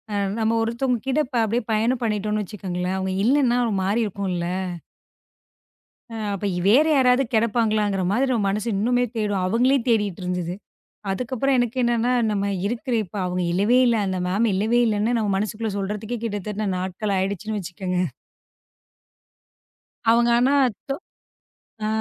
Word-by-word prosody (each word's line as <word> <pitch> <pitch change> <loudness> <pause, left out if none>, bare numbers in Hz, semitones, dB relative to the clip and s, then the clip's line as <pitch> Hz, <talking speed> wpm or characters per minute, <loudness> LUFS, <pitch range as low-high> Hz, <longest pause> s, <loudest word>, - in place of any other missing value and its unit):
அம் 200 0 -1
நம்ம 220 +1 +1
ஒருத்தங்க 235 +2 0
கிட்ட 270 +3 +1
இப்ப 250 -2 -2
அப்டியே 230 +3 -1
பயணம் 230 +4 +1
பண்ணிட்டோம்னு 210 -1 -1
வச்சுக்கோங்களேன். 185 -2 -4
அவங்க 190 0 -2
இல்லன்னா 255 -1 +3
ஒரு 225 - -1
மாரி 200 +5 +1
இருக்கும்ல. 190 -4 -3 1.7
அ, - - -6 0.2
அப்ப 200 - -5
இ - - -1
வேற 260 +9 +6
யாராவது 255 0 +4
கிடப்பாங்களாங்கற 215 -3 +1
மாதிரி 260 +6 +1
நம்ம 220 -5 +1
மனசு 210 +3 -2
இன்னுமே 245 +3 +2
தேடும் 205 -3 0
அவங்களே 250 +7 +3
தேடிட்டுருந்துது. 180 -5 -1 0.6
அதுக்கப்புறம் 255 +5 0
எனக்கு 245 0 0
என்னன்னா, 240 0 +1 0.2
நம்ம 200 -1 0 0.2
இருக்குற 240 +3 -2
இப்ப 200 +2 -11
அவங்க 180 0 -1
இல்லவே 205 +8 +3
இல்ல. 235 -1 +3
அந்த 185 -1 -2
மேம் 210 +5 +1
இல்லவே 220 +5 +2
இல்லன்னு, 220 +2 +1
நம்ம 215 -2 0
மனசுக்குள்ள 215 +2 -2
சொல்றதுக்கே 210 +4 -3
கிட்டத்தட்ட 210 -1 -3
நாட்கள் 190 +3 -2
ஆயிடுச்சின்னு 200 +3 -2
வச்சுக்கங்க. 180 0 -4 2.1
அவங்க 235 +1 +4
ஆனா, 260 +4 +3 0.3
தொ 275 - 0 0.9
அ - - 0
215 Hz, 140 wpm, -23 LUFS, 195-240 Hz, 2.1 s, வேற